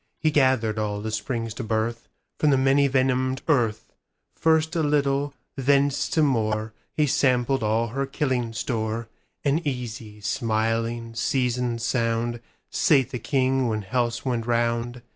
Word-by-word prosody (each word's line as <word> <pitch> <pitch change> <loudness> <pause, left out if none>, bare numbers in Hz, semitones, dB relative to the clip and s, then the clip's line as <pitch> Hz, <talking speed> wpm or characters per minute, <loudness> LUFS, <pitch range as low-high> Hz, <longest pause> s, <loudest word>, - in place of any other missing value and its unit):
He 155 - +1
gathered 130 -7 +2
all 105 -1 -2
that 110 +1 -4
springs 115 +1 -3
to 125 - -5
birthFrom 110 +1 -2 0.4
the 135 - +4
many 135 +2 +4
venomed 130 0 +1
earth; 120 -9 +1 0.4
First 160 +1 +2
a 165 - +2
little, 145 -1 +1 0.2
thence 140 +1 +2
to 160 - +2
more, 110 -5 0 0.2
He 150 - +3
sampled 130 -1 +2
all 110 +2 +1
her 135 +4 -2
killing 130 -4 -1
store; 110 0 -2 0.4
And 145 +4 +2
easy, 115 -6 -5
smiling, 115 0 -1
seasoned 120 0 0
sound, 115 0 0 0.3
Sate 135 -5 +3
the 125 - -3
king 130 0 +1
when 110 -2 -1
healths 120 +3 -1
went 120 -3 -1
round. 120 +1 0
120 Hz, 140 wpm, -25 LUFS, 115-135 Hz, 0.4 s, the